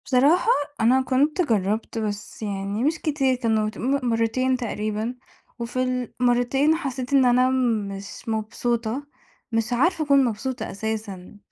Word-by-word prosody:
بصراحة 285 - +3 0.3
أنا 250 +4 +4
كنت 280 +6 +1
جرّبت 220 - 0
بس 210 -1 -4
يعني 200 +1 -3
مش 310 +3 +1
كتير، 275 -4 +1
كان 220 -3 0
ت - - -14
مرّتين 255 0 +1
تقريبًا 215 0 -3 0.4
وفي 250 +1 -1
المرّتين 250 +5 +3
حسّيت 270 -5 -4
إن 270 -2 +5
أنا 250 +1 +4 0.4
مش 195 0 -8
مبسوطة، 230 +3 -2 0.5
مش 225 +1 0
عارفة 320 +6 +2
أكُون 280 -1 +5
مبسوطة 245 +3 -3
أساسًا. 210 -3 -5
245 Hz, 125 wpm, -24 LUFS, 220-265 Hz, 0.5 s, إن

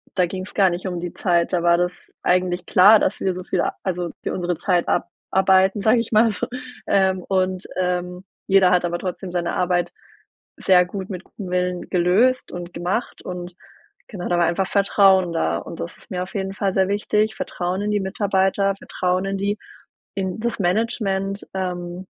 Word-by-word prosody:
da 180 - +3
ging's 185 +2 -6
gar 195 -2 +4
nicht 175 +2 -4
um 180 -2 -3
die 175 -1 -5
Zeit. 170 -2 +1
Da 175 -2 +1
war 170 0 +5
das 180 0 -3
eigentlich 180 -1 +1
klar, 205 +4 +7
dass 200 - 0
wir 190 - +1
so 185 - -6
viel - - 0 0.2
also 175 -3 -2
für - - -2
unsere 175 -2 -2
Zeit 180 -1 +1
abarbeiten, 190 +1 +2
sage 220 +4 +4
ich 230 - -3
mal 220 +1 +5
so. 235 +4 -3 0.4
Ähm, 190 -2 +2
und, 185 -1 0
ähm, 180 0 -2 0.2
jeder 190 -2 +5
hat 180 -1 +3
aber 175 0 -2
trotzdem 180 0 -5
seine 175 -1 -1
Arbeit 175 -1 0 0.7
sehr 180 -1 +4
gut 190 +1 -6
mit 185 -2 -6
gutem 195 -4 -9
Willen 180 -1 -1
gelöst 200 +9 +2
und 175 0 -7
gemacht 180 +7 -3
und 180 -1 -6 0.5
genau 185 -5 -6
da 175 - +2
war 170 - +4
einfach 190 +2 0
Vertrauen 195 -3 +4
da 85 - 0
und - - -8
das 85 - -6
ist - - -21
mir 180 -1 -2
auf 185 - -11
jeden 195 -1 -2
Fall 195 -1 -1
sehr 190 -1 +2
wichtig. 210 +1 0
Vertrauen 180 +1 -3
in 210 0 -1
die 205 - +1
Mitarbeiter, 195 0 +1
Vertrauen 185 0 -1
in 195 0 -2
die 200 +2 -1 0.6
in 190 +1 -3
das 235 0 -2
Management, 195 0 -1
ähm, 180 -1 -4
185 Hz, 185 wpm, -22 LUFS, 180-195 Hz, 0.7 s, klar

